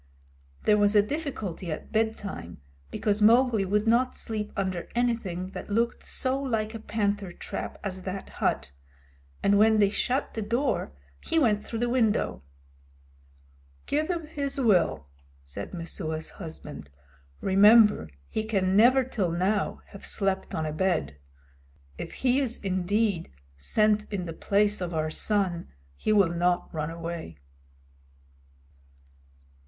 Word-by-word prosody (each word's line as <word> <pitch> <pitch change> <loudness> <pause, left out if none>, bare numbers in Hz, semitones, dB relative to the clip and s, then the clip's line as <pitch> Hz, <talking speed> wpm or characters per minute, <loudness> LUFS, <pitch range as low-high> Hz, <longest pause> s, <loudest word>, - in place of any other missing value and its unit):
There 210 0 +4
was 205 +1 +3
a 205 - +7
difficulty 210 - -4
at 155 - -6
bedtime, 215 - -2 0.3
because 210 - 0
Mowgli 230 -1 +5
would 210 +3 +1
not 245 +3 +3
sleep 215 -2 -4
under 185 -3 -2
anything 205 -7 -1
that - - -7
looked 230 +3 0
so 265 +1 -1
like 220 -5 -1
a 225 - -6
panther 205 -3 -1
trap - - -6
as 190 -2 -4
that 190 +1 -5
hut, 70 - 0 0.7
and 200 0 +4
when 220 +1 +5
they 205 -2 +5
shut 260 +6 -1
the 220 - -3
door 235 - 0 0.3
he 330 - -1
went 215 -8 +3
through 230 - -5
the 240 +1 0
window. 230 - +1 1.4
"Give 305 +2 0
him 340 -3 -2
his 285 -3 -3
will," 180 - +3 0.4
said 70 +9 -7
Messua's 160 -2 -4
husband. 75 - -9 0.5
"Remember 205 - +6 0.2
he 220 - -2
can 195 -4 +1
never 250 +5 +6
till 215 -8 -1
now 185 +5 0
have 200 - -12
slept 195 -1 -1
on 160 - -1
a 155 - -3
bed. 155 - 0 0.8
If - - -5
he 255 +1 +2
is 250 -4 -1
indeed 195 - 0 0.2
sent 210 - +1
in 190 -3 -2
the 165 - -5
place 205 +4 +1
of 175 -2 -3
our 155 0 -1
son 185 -3 0 0.3
he 215 - -1
will 195 -5 +4
not 175 +1 0
run 155 -1 -2
away." 165 - -6
205 Hz, 135 wpm, -27 LUFS, 175-225 Hz, 1.4 s, a